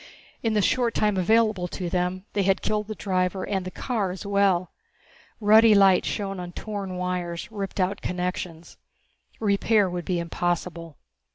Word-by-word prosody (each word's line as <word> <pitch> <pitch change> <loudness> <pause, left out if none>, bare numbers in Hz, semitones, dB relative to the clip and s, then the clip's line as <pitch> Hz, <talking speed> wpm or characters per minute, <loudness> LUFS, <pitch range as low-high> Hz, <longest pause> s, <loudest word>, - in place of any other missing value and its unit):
In 225 -2 0
the 210 - +3
short 240 +1 +1
time 210 -1 +2
available 215 0 +2
to 180 0 -5
them 180 +2 -1
they 205 - +1
had 195 0 +1
killed 210 -1 -1
the 215 - -5
driver 185 -1 -1
and 190 -2 -2
the - - -3
car 215 -1 -2
as 185 +3 -7
well. 200 -3 +2 0.7
Ruddy 215 +1 +6
light 195 -2 +5
shone 195 -2 -3
on 175 -1 -7
torn 200 -3 -5
wires, 180 +1 -3
ripped 200 -2 -5
out 190 +2 0
connections. 180 -2 -4 0.6
Repair 205 0 +2
would 175 -1 -4
be 180 - 0
impossible. 170 -2 -3
190 Hz, 160 wpm, -25 LUFS, 180-210 Hz, 0.7 s, Ruddy